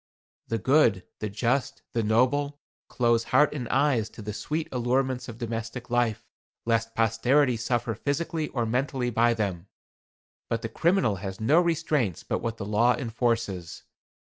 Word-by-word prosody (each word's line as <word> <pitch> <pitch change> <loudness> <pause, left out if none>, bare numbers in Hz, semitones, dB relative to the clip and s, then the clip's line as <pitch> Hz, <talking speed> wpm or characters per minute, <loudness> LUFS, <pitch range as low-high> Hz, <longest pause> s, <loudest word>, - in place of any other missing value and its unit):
The 115 - -1
good, 120 -5 +3
the 105 - -3
just, 125 +6 -1
the 115 - +1
noble, 130 +6 +1 0.3
close 120 -2 +1
heart 150 +4 +3
and 125 -6 -5
eyes 130 -6 +2
to 110 - -11
the 105 0 -4
sweet 155 +8 -3
allurements 130 +1 0
of 115 - -8
domestic 115 +1 -5
life, 120 -3 +1 0.4
lest 115 0 0
posterity 120 +4 +3
suffer 120 +1 -1
physically 150 +7 -2
or 120 -3 -2
mentally 125 +1 -1
by 115 +1 +3
them. 100 -4 -3 0.8
But 115 0 -1
the 115 - -3
criminal 165 - +2
has 95 0 -6
no 145 +10 +4
restraints 155 - 0
but - - -2
what 115 -1 -3
the 100 - -5
law 115 +4 +3
enforces. 115 - -2
120 Hz, 150 wpm, -27 LUFS, 110-135 Hz, 0.8 s, no